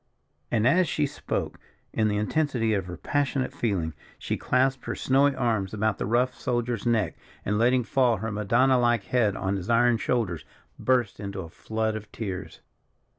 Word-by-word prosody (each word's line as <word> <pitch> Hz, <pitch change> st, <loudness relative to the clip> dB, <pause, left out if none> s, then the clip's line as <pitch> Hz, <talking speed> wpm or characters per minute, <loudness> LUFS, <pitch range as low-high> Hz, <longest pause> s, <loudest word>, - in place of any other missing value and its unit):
And, 110 Hz, -2 st, +1 dB
as 170 Hz, +8 st, +4 dB
she 150 Hz, -, +1 dB
spoke, 145 Hz, -, -4 dB, 0.3 s
in 110 Hz, -1 st, +2 dB
the 105 Hz, -1 st, 0 dB
intensity 115 Hz, 0 st, 0 dB
of 95 Hz, -3 st, -1 dB
her 90 Hz, -1 st, -6 dB
passionate 135 Hz, -, -1 dB
feeling, 90 Hz, -9 st, -1 dB, 0.2 s
she -, -, -2 dB
clasped 130 Hz, 0 st, +1 dB
her -, -, -3 dB
snowy 140 Hz, +1 st, +3 dB
arms 110 Hz, -6 st, 0 dB
about 110 Hz, 0 st, 0 dB
the -, -, -2 dB
rough 125 Hz, +3 st, +2 dB
soldier's 120 Hz, -2 st, -2 dB
neck, 115 Hz, -2 st, +1 dB, 0.3 s
and 105 Hz, +2 st, 0 dB
letting 125 Hz, +2 st, +3 dB
fall 120 Hz, -1 st, +2 dB
her 110 Hz, +4 st, -4 dB
Madonna 120 Hz, +6 st, +3 dB
like 120 Hz, -3 st, +2 dB
head 110 Hz, -2 st, +1 dB
on 95 Hz, +1 st, -1 dB
his 95 Hz, +3 st, -6 dB
iron 120 Hz, 0 st, +4 dB
shoulders, 110 Hz, -9 st, -1 dB, 0.4 s
burst 125 Hz, -5 st, +1 dB
into 100 Hz, -1 st, -5 dB
a 85 Hz, -, -8 dB
flood 110 Hz, +4 st, -2 dB
of 110 Hz, -1 st, -8 dB
tears. 95 Hz, -5 st, -6 dB
115 Hz, 175 wpm, -26 LUFS, 105-125 Hz, 0.4 s, as